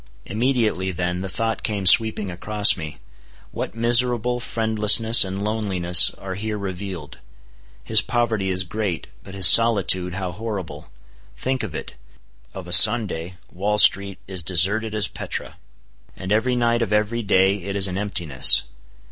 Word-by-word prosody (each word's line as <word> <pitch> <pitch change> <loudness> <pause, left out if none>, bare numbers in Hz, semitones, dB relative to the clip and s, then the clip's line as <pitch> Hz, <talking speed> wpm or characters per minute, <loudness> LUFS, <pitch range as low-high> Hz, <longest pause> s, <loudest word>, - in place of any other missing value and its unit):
Immediately 110 -4 -3
then 90 +1 -5
the 95 - -7
thought 115 +3 -5
came 100 -3 -5
sweeping 105 0 +4
across 105 +4 +3
me, 80 -3 -10 0.5
What - - -8
miserable 120 +1 0
friendlessness 110 0 +3
and 95 +1 -7
loneliness 95 -5 +3
are 95 -1 -9
here 105 +2 -6
revealed! 95 -6 -9 0.6
His - - +4
poverty 110 -5 -3
is 95 0 0
great; 95 -2 -6 0.2
but 95 - -14
his 95 -2 +4
solitude, 95 -3 +3
how 95 -2 -6
horrible! 100 - -9 0.5
Think 130 -1 -4
of 95 -8 -8
it. - - -10 0.6
Of 95 -2 -10
a 90 - -3
Sunday, 90 -5 +3 0.2
Wall 105 +3 -3
street 100 -2 +3
is 95 -2 -3
deserted 100 +6 +1
as 105 - +1
Petra; - - -8 0.6
and 95 0 -9
every 125 +4 -1
night 120 -1 -1
of 110 -3 -4
every 105 +2 -2
day 95 -1 0
it 100 +1 -8
is 100 -1 +1
an 95 0 -3
emptiness. 85 -10 +2
100 Hz, 150 wpm, -19 LUFS, 95-110 Hz, 0.6 s, sweeping